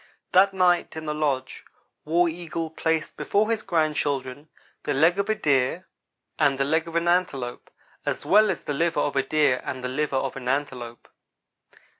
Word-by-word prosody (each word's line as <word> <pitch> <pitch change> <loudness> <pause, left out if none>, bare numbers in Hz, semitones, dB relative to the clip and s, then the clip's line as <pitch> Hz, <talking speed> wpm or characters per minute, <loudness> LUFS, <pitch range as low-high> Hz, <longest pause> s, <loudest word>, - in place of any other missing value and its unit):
That 195 +2 +5
night 180 -3 +2
in 160 - -6
the 150 - -2
lodge 140 -4 -2 0.4
War 170 +3 +3
Eagle 165 -1 -4
placed 160 -1 -1
before 215 +2 +1
his 225 -1 0
grandchildren 150 -5 -1 0.3
the 145 - -2
leg 165 +7 +4
of 200 - -1
a 220 - +2
deer 145 0 +1 0.5
and 140 -3 +3
the 135 - +1
leg 160 +3 +1
of 165 - -8
an 170 0 +1
antelope, 145 -9 -1 0.3
as - - -3
well 215 0 +5
as 190 - -2
the 145 - -3
liver 165 +3 0
of 145 - -1
a 135 - +3
deer 135 -2 +2
and 130 -1 -5
the 125 - -2
liver 145 +1 -1
of 135 0 -2
an 125 -2 -7
antelope. 125 -4 -3
155 Hz, 180 wpm, -25 LUFS, 135-175 Hz, 0.5 s, That